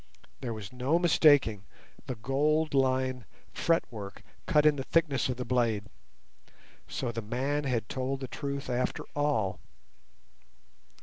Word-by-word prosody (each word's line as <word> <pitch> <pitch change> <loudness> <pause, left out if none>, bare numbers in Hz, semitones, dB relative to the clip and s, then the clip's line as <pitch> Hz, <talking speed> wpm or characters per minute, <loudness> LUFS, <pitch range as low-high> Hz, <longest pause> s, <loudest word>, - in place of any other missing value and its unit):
There 125 - -4
was 110 0 -7
no 130 +6 +1
mistaking 145 - +4 0.4
the 130 - -3
gold 150 +7 +1
lined 130 -2 +1 0.3
fretwork 115 -11 -1 0.2
cut 150 -1 +4
in 150 -1 +6
the 135 - -2
thickness 150 -4 +1
of 125 - -2
the 125 - -4
blade. 115 -5 +1 1.0
So 120 - -3
the 115 0 -4
man 135 +7 -1
had 120 -5 -1
told 135 +1 -3
the 130 - -4
truth 140 +2 -4
after 125 0 -1
all. 115 -10 0
130 Hz, 130 wpm, -30 LUFS, 120-145 Hz, 1.0 s, in